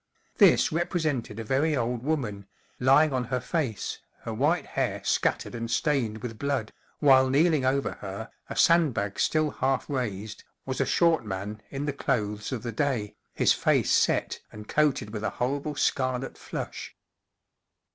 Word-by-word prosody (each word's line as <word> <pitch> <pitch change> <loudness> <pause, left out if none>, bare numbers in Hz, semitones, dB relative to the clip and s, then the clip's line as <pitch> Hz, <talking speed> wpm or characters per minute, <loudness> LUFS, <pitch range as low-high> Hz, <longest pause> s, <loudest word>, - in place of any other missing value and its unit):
This - - +6
represented 155 - -1
a - - -3
very 140 +7 +1
old 120 -1 -1
woman, 120 -9 -2 0.3
lying 135 +4 +5
on 125 -1 0
her 130 +1 -1
face, 125 - -2 0.2
her - - -5
white - - +1
hair - - -2
scattered - - 0
and 115 -1 -4
stained 120 -5 0
with 115 -3 -6
blood, 140 -6 -2 0.2
while 130 -2 +5
kneeling 150 0 +3
over 135 +1 +1
her, 100 +2 -6 0.2
a - - -5
sand¬ 165 -6 +4
bag 100 0 -2
still 155 -1 +2
half 135 0 -1
raised, 110 -6 -4 0.2
was 130 -1 -2
a - - +1
short 170 -4 +3
man 105 +1 -5
in 140 +1 -4
the 145 - -1
clothes 105 -5 -2
of 120 -4 -4
the 120 - -3
day, 125 -7 -1 0.2
his - - +4
face - - +2
set - - +2
and 105 0 -10
coated 145 -8 +1
with 110 -1 -5
a 110 - +1
horrible 140 +4 -1
scarlet 130 -1 0
flush. - - -6
130 Hz, 160 wpm, -27 LUFS, 110-145 Hz, 0.3 s, This